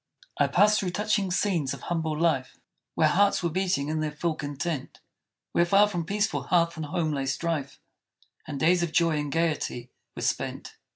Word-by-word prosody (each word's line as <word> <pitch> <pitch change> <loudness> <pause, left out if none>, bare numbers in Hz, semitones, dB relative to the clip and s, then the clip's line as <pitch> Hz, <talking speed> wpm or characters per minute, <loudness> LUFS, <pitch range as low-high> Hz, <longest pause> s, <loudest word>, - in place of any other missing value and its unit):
I - - +4
passed 210 +1 +4
through 190 - -1
touching 205 +1 0
scenes 175 -7 0
of 130 - -14
humble 160 -3 -2
life, 160 -6 0 0.4
Where - - +4
hearts 200 +1 +3
were 170 - 0
beating 185 -5 0
in 155 +1 -1
their 155 0 -1
full 160 +2 -1
content; 145 0 -4 0.5
Where 170 - +3
far 200 +4 +5
from 175 -5 -3
peaceful 205 +4 0
hearth 170 -1 +1
and 160 -2 -5
home 165 -1 -1
lay 135 -2 -2
strife, 140 0 -2 0.7
And 145 -3 -5
days 175 +4 +3
of 170 -2 -1
joy 165 -3 +3
and 145 -1 -3
gaiety 155 -7 -1 0.2
were - - -5
spent. - - -3
165 Hz, 180 wpm, -27 LUFS, 150-180 Hz, 0.7 s, far